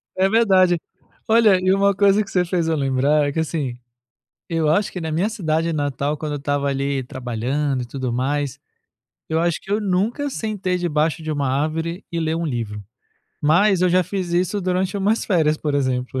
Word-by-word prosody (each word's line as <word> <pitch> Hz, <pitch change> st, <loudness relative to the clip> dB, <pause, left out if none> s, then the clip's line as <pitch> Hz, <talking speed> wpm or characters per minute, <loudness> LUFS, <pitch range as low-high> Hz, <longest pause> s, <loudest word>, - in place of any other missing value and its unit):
É 190 Hz, +1 st, +2 dB
verdade. 190 Hz, -5 st, +4 dB, 0.5 s
Olha, 220 Hz, -4 st, +5 dB
e 185 Hz, +1 st, +2 dB
uma 200 Hz, +1 st, +3 dB
coisa 200 Hz, +1 st, +4 dB
que 195 Hz, -, -13 dB
você 180 Hz, -1 st, +2 dB
fez 170 Hz, -2 st, -1 dB
eu 165 Hz, -, +1 dB
lembrar, 140 Hz, +1 st, +2 dB
é -, -, -1 dB
que, 160 Hz, -, -2 dB
assim, 150 Hz, -6 st, -2 dB, 0.7 s
eu 165 Hz, -2 st, 0 dB
acho 200 Hz, +6 st, +1 dB
que 180 Hz, -, -5 dB
na 160 Hz, -1 st, -3 dB
minha 170 Hz, +7 st, +1 dB
cidade 165 Hz, -6 st, -1 dB
natal, 145 Hz, -1 st, -1 dB
quando 150 Hz, 0 st, -4 dB
eu -, -, -3 dB
estava 145 Hz, 0 st, -1 dB
ali 140 Hz, 0 st, -1 dB
trabalhando 130 Hz, +2 st, -2 dB
e -, -, -6 dB
tudo 130 Hz, 0 st, -4 dB
mais, 140 Hz, +2 st, -1 dB, 0.7 s
eu 160 Hz, -, +1 dB
acho 170 Hz, 0 st, 0 dB
que 195 Hz, -, -9 dB
eu 210 Hz, -, +2 dB
nunca 210 Hz, +8 st, 0 dB
sentei 205 Hz, -7 st, -2 dB
debaixo 160 Hz, -2 st, 0 dB
de 155 Hz, -, -3 dB
uma 145 Hz, -2 st, -1 dB
árvore 160 Hz, +6 st, -2 dB
e 170 Hz, -, -2 dB
ler 160 Hz, 0 st, -1 dB
um 170 Hz, 0 st, -2 dB
livro. 115 Hz, -7 st, -4 dB, 0.6 s
Mas 180 Hz, +6 st, +3 dB
eu 185 Hz, -, +4 dB
já 180 Hz, +1 st, +3 dB
fiz 185 Hz, -1 st, -4 dB
isso 180 Hz, +3 st, 0 dB
durante 185 Hz, +1 st, -1 dB
umas 205 Hz, +3 st, +1 dB
férias, 160 Hz, -6 st, +2 dB
por 150 Hz, -2 st, -2 dB
exemplo. 130 Hz, -2 st, -1 dB
160 Hz, 195 wpm, -21 LUFS, 145-185 Hz, 0.7 s, Olha